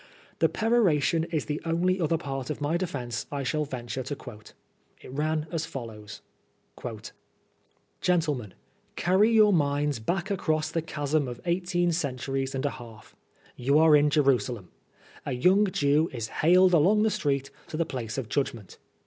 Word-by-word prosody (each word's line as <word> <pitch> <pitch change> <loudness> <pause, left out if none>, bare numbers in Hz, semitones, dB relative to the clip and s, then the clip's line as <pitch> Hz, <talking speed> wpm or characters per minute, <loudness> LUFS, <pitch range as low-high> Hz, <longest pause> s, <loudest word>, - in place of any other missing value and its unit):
The - - +4
peroration 180 -9 +2
is 165 -3 -2
the 150 0 -3
only 180 +3 +1
other 165 0 +1
part 135 -4 -5
of 150 - -3
my 145 +3 0
defence 130 -10 -3
I 140 -1 -3
shall 150 +3 -1
venture 125 -2 -5
to 135 +3 -4
quote. 110 -6 -12 0.5
It - - -10
ran 155 +2 -1
as 165 -1 -2
follows: 105 -4 -8 0.6
_ - - -7 0.5
" - - -42
Gentlemen, 150 - 0 0.4
carry 195 +5 +3
your 215 -2 +6
minds 145 -4 +1
back 175 - -2
across 155 -5 0
the 165 - -1
chasm 150 -2 -1
of 120 -1 -6
eighteen 175 0 +1
centimes 135 -3 -2
and 135 +2 -2
a 145 - +1
half. 115 -2 -13 0.4
You 140 +4 +2
are 160 -1 +6
in 150 0 +4
Jerusalem. 130 - +1 0.5
A - - -3
young 185 +11 +4
Jew 150 -2 +2
is 115 -3 -5
haled 180 +3 +5
along 190 +7 +4
the 220 - +2
street 140 -4 -1 0.2
to 155 - -5
the 165 - +1
place 120 -6 -5
of 130 -4 -3
judgment. 115 -4 -3
150 Hz, 165 wpm, -27 LUFS, 130-170 Hz, 0.6 s, your